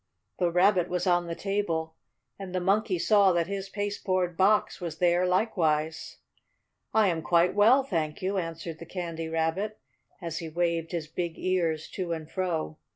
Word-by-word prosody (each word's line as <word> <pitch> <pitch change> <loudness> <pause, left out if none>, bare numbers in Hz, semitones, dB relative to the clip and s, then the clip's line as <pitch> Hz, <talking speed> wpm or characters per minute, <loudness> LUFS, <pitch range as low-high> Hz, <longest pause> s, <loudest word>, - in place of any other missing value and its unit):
The 175 - +2
Rabbit 180 0 +3
was 180 +1 -1
on 175 -1 +2
the 170 - -4
table, 170 -6 -2 0.5
and 185 -2 -6
the - - +2
Monkey 195 +1 +1
saw 200 +2 +4
that 170 -1 +1
his 195 +1 -5
pasteboard 190 -3 -1
box 200 +2 +2
was 165 -3 -5
there 175 +1 +3
likewise. 165 -5 0 0.7
"I 220 -2 +4
am 165 -2 -1
quite 170 +2 +3
well, 235 +7 +5
thank 160 - -2
you," 195 +1 -1
answered 165 -1 -6
the 170 - -9
Candy 165 -3 -5
Rabbit, 165 +7 -1 0.4
as 165 -2 -4
he 165 -2 -6
waved 170 0 -1
his 170 -3 -3
big 165 +1 -4
ears 165 -4 0
to 180 -3 -3
and 160 -2 -6
fro. 165 -3 -3
175 Hz, 165 wpm, -28 LUFS, 165-195 Hz, 0.7 s, well